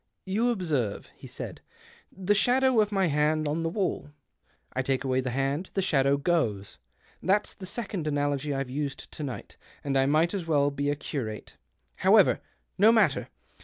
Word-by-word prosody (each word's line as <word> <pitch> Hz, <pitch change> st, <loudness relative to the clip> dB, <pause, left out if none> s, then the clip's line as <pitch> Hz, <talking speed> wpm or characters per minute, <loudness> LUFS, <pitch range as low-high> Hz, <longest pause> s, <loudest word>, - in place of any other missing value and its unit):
"You 215 Hz, +6 st, +1 dB
observe," 155 Hz, -, -2 dB
he -, -, -12 dB
said, -, -, -7 dB, 0.5 s
"the 190 Hz, +2 st, 0 dB
shadow 250 Hz, +3 st, +3 dB
of 210 Hz, 0 st, 0 dB
my 195 Hz, -2 st, +2 dB
hand 155 Hz, 0 st, +1 dB
on 155 Hz, +3 st, -1 dB
the 165 Hz, -, -1 dB
wall. 180 Hz, -5 st, -2 dB, 0.6 s
I 130 Hz, -, 0 dB
take 130 Hz, 0 st, -1 dB
away 130 Hz, -1 st, +1 dB
the 130 Hz, -, -3 dB
hand 135 Hz, +7 st, -1 dB
— -, -, -35 dB
the 195 Hz, -, +2 dB
shadow 140 Hz, -5 st, +3 dB
goes. 140 Hz, -, -1 dB, 0.4 s
That's 205 Hz, +2 st, +1 dB
the 185 Hz, -, -9 dB
second 195 Hz, -5 st, -4 dB
analogy 145 Hz, -1 st, 0 dB
I've 135 Hz, -2 st, -3 dB
used 140 Hz, -1 st, -4 dB
to -, -, -8 dB
night, 135 Hz, -4 st, -6 dB, 0.3 s
and 140 Hz, -1 st, -1 dB
I 135 Hz, 0 st, +3 dB
might 155 Hz, +5 st, +2 dB
as 185 Hz, -5 st, -3 dB
well 145 Hz, -3 st, +3 dB
be 140 Hz, +1 st, -1 dB
a 145 Hz, -, +1 dB
curate. 120 Hz, -7 st, -5 dB, 0.4 s
However, -, -, +5 dB, 0.4 s
no 215 Hz, +3 st, +7 dB
matter 205 Hz, -11 st, +3 dB
150 Hz, 175 wpm, -27 LUFS, 135-190 Hz, 0.6 s, no